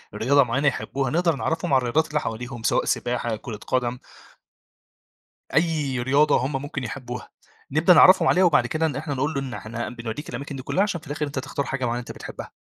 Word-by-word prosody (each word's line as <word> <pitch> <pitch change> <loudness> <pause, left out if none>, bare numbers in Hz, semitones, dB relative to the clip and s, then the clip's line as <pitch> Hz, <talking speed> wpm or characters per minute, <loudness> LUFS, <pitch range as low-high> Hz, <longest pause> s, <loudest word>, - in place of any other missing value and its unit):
رياضة 140 +5 +4
معينة 135 +4 0
يحبوها، 135 -1 -1
نقدر 170 0 +2
نعَرفهم 155 +1 -1
عن - - +7
الرياضات 130 +6 +1
اللي 150 0 0
حواليهم 120 0 -5
سواء - - +2
سباحة 120 -2 -1
كرة 110 0 -7
قدم 125 -1 0 1.6
أيّ 155 -5 +1
رياضة 140 +4 +4
هُم 135 -1 -3
ممكن 145 -2 -5
يحبوها، 125 +1 -6 0.4
نبدأ 160 +5 +5
نعرَّفهم 185 +2 +7
عليها 185 - +4
وبعد 150 -8 +4
كده 155 +6 0
ن 145 - -3
إحنا 145 0 -3
نقول 145 +4 -1
له 140 - 0
إن 130 -3 -5
إحنا 115 +1 -5
بنوديك 120 +4 -6
الأماكن 140 0 -6
دي 130 - -6
كلها، 185 - +1
عشان 200 -5 -1
في - - -18
الآخر 150 +1 -3
أنت 140 -2 -5
تختار 140 +1 -3
حاجة 135 -1 -2
معينة 120 0 -1
أنت 120 - -8
بتحبها. - - -9
135 Hz, 200 wpm, -24 LUFS, 125-150 Hz, 1.6 s, عن